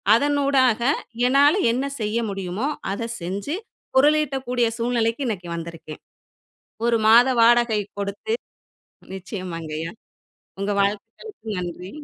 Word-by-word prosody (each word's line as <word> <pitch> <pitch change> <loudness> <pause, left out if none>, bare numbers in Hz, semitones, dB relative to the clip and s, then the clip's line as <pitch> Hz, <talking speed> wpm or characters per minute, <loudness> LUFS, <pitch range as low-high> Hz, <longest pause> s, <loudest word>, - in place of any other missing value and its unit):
அதன் 290 +4 +1
ஊடாக 260 -5 +3 0.5
என்னால 285 +6 +5 0.2
என்ன 260 +4 -1 0.2
செய்ய 215 +2 -1
முடியுமோ 195 +5 -3 0.3
அத 230 +3 -4
செஞ்சு 195 - -3 0.4
பொருளீட்டக்கூடிய 270 -4 +2
சூழ்நிலைக்கு 235 +2 0
இன்னைக்கு 180 -6 -4
வந்திருக்கேன். 165 -2 -8 0.8
1 230 -1 +3
மாத 235 +3 +7
வாடகை 235 -2 +4 0.2
குடுத்து 200 - -2 0.8
நிச்சயமாங்கயா 165 -4 -6 0.7
உங்க 205 +1 -1
வாழ்த்துகளுக்கு 225 - -4
நன்றி. 180 +1 -6
225 Hz, 100 wpm, -23 LUFS, 195-260 Hz, 0.8 s, மாத